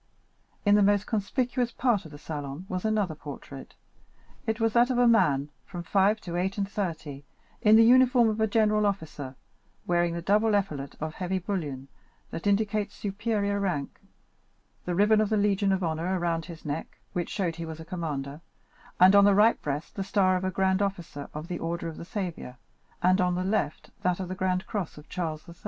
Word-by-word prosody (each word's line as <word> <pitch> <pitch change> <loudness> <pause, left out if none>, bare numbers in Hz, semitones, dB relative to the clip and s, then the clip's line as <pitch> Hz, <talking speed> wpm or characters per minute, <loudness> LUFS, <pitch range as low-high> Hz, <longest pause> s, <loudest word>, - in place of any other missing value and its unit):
In 205 - +5
the 210 - +5
most 205 0 +3
conspicuous 240 +3 -1
part 230 -8 +1
of 160 - -11
the 145 - -10
salon 145 +2 -6
was 185 +2 -3
another 210 -6 +1
portrait. 145 -2 -10 0.7
It 220 +1 0
was 225 -1 +1
that 240 +1 +4
of 255 - 0
a 245 0 +5
man, 145 -11 +3
from 175 -2 -7
five 200 +4 +2
to 170 -1 -6
eight 190 +3 -1
and 200 -1 0
thirty, 160 -8 -4 0.4
in 215 0 +6
the 225 - +8
uniform 250 0 +6
of 220 0 -1
a 220 - +3
general 210 -1 +3
officer, 155 -9 -4 0.5
wearing 175 -1 +1
the 170 - -3
double 210 +3 +3
epaulet 150 -9 -2
of 155 +1 -4
heavy 185 +2 -2
bullion, 155 -9 -4 0.4
that 165 - -4
indicates 210 0 +1
superior 205 0 -1
rank, 175 -8 -2 0.9
the 180 - -1
ribbon 210 +3 +4
of 215 - 0
the 215 - +2
Legion 200 -1 +2
of 190 -1 0
Honor 170 +3 -1
around 165 -2 -1
his 165 -2 -11
neck, 150 +2 -5 0.2
which 175 -1 -2
showed 175 -5 -2
he 170 - -4
was 160 0 -7
a 160 - -8
commander, 150 -5 -4 0.6
and 185 +2 +7
on 200 - +8
the 200 -1 +5
right 215 +3 +4
breast, 145 +1 -4
the 195 - -3
star 190 -1 +2
of 185 - -2
a 185 - 0
grand 190 +1 +1
officer 175 -7 -4
of 155 +2 -5
the 175 -1 -4
order 170 0 -3
of 160 - -7
the - - -8
Saviour, 175 - -5 0.5
and 185 +1 +4
on 180 -1 +1
the 180 - -1
left 190 -6 -2
that 180 0 0
of 185 -2 -4
the - - -3
grand 185 -1 -1
cross 195 -8 -4
of 150 - -12
Charles 160 -4 -4
III. 170 - -10
185 Hz, 200 wpm, -27 LUFS, 165-205 Hz, 0.9 s, the